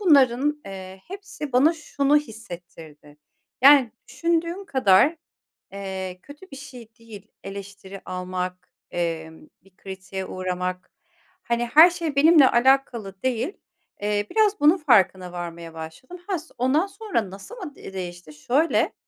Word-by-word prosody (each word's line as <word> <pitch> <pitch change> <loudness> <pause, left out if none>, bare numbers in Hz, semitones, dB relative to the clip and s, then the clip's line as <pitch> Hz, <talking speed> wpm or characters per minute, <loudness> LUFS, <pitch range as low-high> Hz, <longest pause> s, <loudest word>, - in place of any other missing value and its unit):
bunların, 290 - +3
eee, 190 -1 -9
hepsi 385 -7 -8
bana 275 +6 +5
şunu 295 -2 +1
hissettirdi, 170 - -8 0.5
yani, 275 -4 +7 0.2
düşündüğün 340 +3 -1
kadar, 265 - +4 0.6
eee, 190 -2 -6
kötü 295 +6 -14
bir 275 - -8
şey 255 -5 -11
değil 220 -4 -12 0.2
eleştiri 195 0 -9
almak, 180 0 -5 0.2
emm, 160 -2 -4 0.2
bir 195 -1 -25
kritiğe 190 0 -7
uğramak, 185 0 -4 0.5
hani, 235 0 -1
her 310 +8 +8
şey 335 -4 -4
benimle 295 -1 +6
alakalı 240 -6 +1
değil. 255 - -1 0.5
Eee, 205 0 -1
biraz 425 -3 +2
bunun 300 +5 +5
farkına 190 - +3
varmaya 170 -1 -7
başladım. 160 - -9
Ha, 380 -4 -1
so 320 - -17
ondan 275 +9 +2
sonra 390 - -3
nasıl 200 - -10
mı 355 -10 -8
de 195 - -11
değişti? 175 -3 -7
Şöyle; 265 - +1
230 Hz, 130 wpm, -24 LUFS, 185-295 Hz, 0.6 s, her